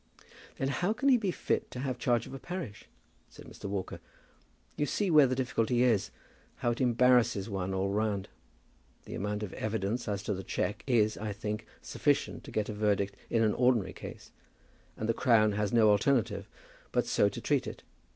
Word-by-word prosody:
"Then 135 - -1
how 175 +9 0
can 275 +5 +1
he 255 - +6
be 210 -5 -1
fit - - -1
to 125 - -7
have 130 -2 -3
charge 120 -1 +1
of - - -10
a 135 - -6
parish?" 175 - -6 0.4
said - - -13
Mr. - - -12
Walker. 100 -1 -4 0.8
"You 145 - 0
see 200 +3 0
where 150 -3 +7
the 130 - 0
difficulty 125 -1 +1
is. 115 -6 +2 0.5
How 120 - 0
it 120 - -3
embarrasses 120 -4 +3
one 95 -1 -2
all 95 +1 0
round. 105 -2 -1 0.8
The - - -8
amount 105 +1 -3
of 100 - -5
evidence 110 +2 -2
as 100 -1 -2
to 105 - -1
the 95 - -4
cheque 100 - -2
is, 110 -4 +2
I 105 -1 -3
think, 105 0 -4 0.2
sufficient - - 0
to - - -9
get 105 -1 -1
a 105 - -4
verdict 100 -1 0
in 115 -1 +2
an 105 -1 +3
ordinary 120 -6 +2
case, - - -10 0.7
and 110 - -3
the 115 - +2
Crown 110 -3 +4
has 105 0 -1
no 110 -3 +5
alternative 115 +3 +1 0.4
but - - +1
so - - +3
to - - -7
treat - - 0
it. - - -8
110 Hz, 190 wpm, -30 LUFS, 105-125 Hz, 0.8 s, where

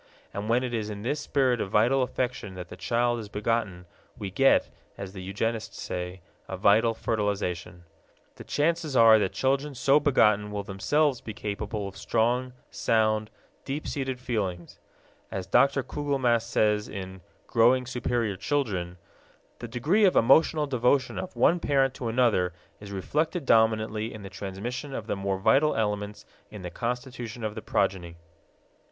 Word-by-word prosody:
And 105 +2 -4
when 120 +2 +3
it 125 -1 -3
is 110 -2 -2
in 105 -1 -6
this 145 +5 -1
spirit 130 -4 +1
of - - -3
vital 120 +7 +3
affection 125 -5 -3
that 90 -2 -8
the - - -8
child 120 +6 0
is 105 -2 -8
begotten, 105 -4 -2 0.3
we 100 -2 -5
get, 135 +7 +4 0.3
as 100 -1 -7
the 95 - -7
eugenists 110 +4 -3
say, 90 +1 -5 0.3
a 95 - -5
vital 110 +4 +4
fertilization. 100 -6 -2 0.5
The - - -9
chances 160 -1 0
are 115 -2 +7
that 95 -3 0
children 135 +2 0
so 135 +4 +4
begotten 105 -8 +3
will 105 -1 -4
themselves 130 +8 +1
be 110 - -7
capable 105 0 -4
of 95 - -9
strong, 120 +5 0 0.2
sound, 110 -1 +1 0.3
deep 140 +3 -4
seated 130 -3 -3
feelings. 95 -9 -3 0.5
As 95 -1 -4
Dr. 135 +8 +3
Kugelmass 130 -5 0
says 105 -3 +1
in 95 -2 -7 0.2
Growing 125 +3 +3
Superior 120 -4 -1
Children, 95 -8 -2 0.6
"The 120 - -6
degree 150 - +2
of 185 - +3
emotional 150 +5 +4
devotion 130 0 +1
of 185 - -6
one 175 - +3
parent 135 -4 +2
to 125 - -5
another 115 -7 +2 0.3
is 100 -1 -10
reflected 155 - -1
dominantly 110 -1 +2
in 110 -2 -9
the 95 - -9
transmission 115 +9 -5
of 110 - -5
the 110 - -2
more 100 -1 -2
vital 140 +10 +3
elements 105 -1 -2 0.2
in 105 -3 -9
the 90 - -5
constitution 120 0 -5
of 110 -1 -2
the 110 - -7
progeny." 90 -5 -1
115 Hz, 160 wpm, -27 LUFS, 100-130 Hz, 0.6 s, are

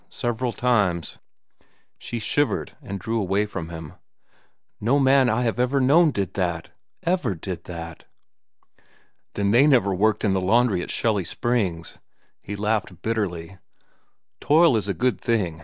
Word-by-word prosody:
Several 120 +1 -2
times." 105 -10 0 0.8
She 120 - -5
shivered 115 +2 -1
and 100 0 -6
drew 115 +4 -2
away 100 +2 +1
from 85 -5 -6
him. 80 -3 -8 0.9
"No 120 +7 +2
man 135 -1 +4
that 110 - +2
I 125 - 0
have 115 0 -1
ever 125 +3 +2
known 155 +6 +5
did 100 - -3
that—ever 100 - -3
did 90 +2 -6
that." 85 -2 -8 1.3
"Then 100 -1 +1
they 130 +6 +5
never 120 -9 +3
worked 105 +3 +1
in 100 - +2
the 95 - 0
laundry 110 0 +2
at - - -6
Shelly 110 -4 0
Hot 85 - -6
Springs," 95 -9 -2 0.4
he 105 - -6
laughed 105 -4 -2
bitterly. 95 -5 -3 0.8
"Toil 160 -2 +4
is 105 -2 -1
a 100 - -1
good 120 -7 0
thing. 100 -9 -1
105 Hz, 150 wpm, -23 LUFS, 95-125 Hz, 1.3 s, known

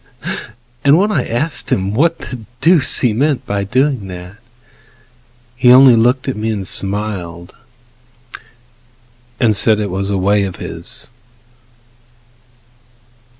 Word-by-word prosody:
And 145 +2 +5
when 205 +4 +1
I 140 -11 -1
asked 145 +7 -1
him 95 +1 -1
what 165 +8 +1
the 125 - -8 0.2
deuce 165 -4 +3
he 120 -4 +2
meant 140 +4 -1
By 100 0 -2
doing 130 0 -1
that, 90 +2 -10 1.2
he 125 0 +4
only 130 -1 +7
looked 125 +4 +1
at 135 - -2
me 110 +1 -3
And 105 -3 -3
grinned, 95 -4 -3 1.9
and 115 -5 +2
said 110 0 +3
it 105 -3 -3
was 95 +1 -3
a 100 - -1
way 100 +2 +1
of 95 - -6
his. - - -3
110 Hz, 125 wpm, -15 LUFS, 100-130 Hz, 1.9 s, only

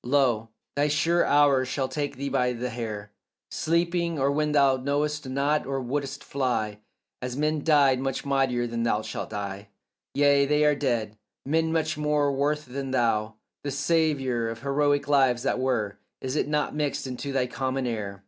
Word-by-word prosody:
Lo, 120 -4 +2 0.3
thy 145 +1 +2
sure 165 +4 +2
hour 145 -3 +4
shall 130 +1 -2
take 145 +1 -3
thee 140 +2 -4
by 125 -2 +1
the 125 +1 -4
hair 105 -3 -5 0.4
Sleeping, 170 0 0
or 140 0 +2
when 150 +1 0
thou 140 -2 +4
knowest 145 +2 -1
not, 140 +2 0
or 135 0 -1
wouldst 135 +2 -3
fly; 125 -6 -1
And 105 - -17 0.4
as 125 0 -4
men 150 0 0
died 140 -5 +4
much 135 +1 -3
mightier 135 -3 +1 0.4
shalt - - -5
thou 110 - -5
die. 100 +1 -9 0.5
Yea, 140 0 +4
they 150 +1 +3
are 150 - +5
dead, 120 -7 -1 0.3
men 160 +3 +1
much 155 -1 0
more 150 -1 +2
worth 150 +2 0
than 135 +1 -5
thou; 115 -4 +1 0.3
The 145 - -2
savour 140 -5 +1
of 115 0 -7
heroic 145 +1 +1
lives 130 -4 +3
that - - 0
were, 120 -6 -1 0.2
Is 130 +1 -4
it - - +1
not 150 0 0
mixed 150 -2 -2
into 130 +2 -5
thy 135 -2 +1
common 130 +1 -2
air? 105 -5 -4
140 Hz, 175 wpm, -26 LUFS, 125-145 Hz, 0.5 s, are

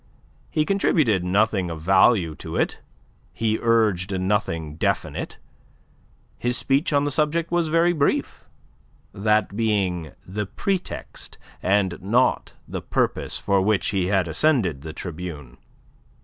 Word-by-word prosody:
He 155 - +1
contributed 155 - +2
nothing 95 0 +1
of 80 -1 -5
value 95 0 +4
to - - -7
it; - - 0 0.5
he 110 -1 -1
urged 105 -5 +2
nothing 90 -6 -1
definite. - - -2 1.0
His 120 0 +1
speech 140 +5 +1
on 145 -1 +3
the 145 - -1
subject 155 +3 0
was 175 -2 +1
very 165 +2 +3
brief 145 -4 -1 0.6
that 105 0 +1
being 95 -7 0
the 105 +2 -4
pretext 190 - -4 0.2
and 95 -2 +1
not 115 +7 +1
the - - -5
purpose - - -1
for 100 -1 +1
which 105 +1 +1
he 95 -3 0
had 95 -3 +1
ascended 95 - +1
the 80 +1 -7
tribune. 80 -5 -7
105 Hz, 125 wpm, -23 LUFS, 90-130 Hz, 1.0 s, value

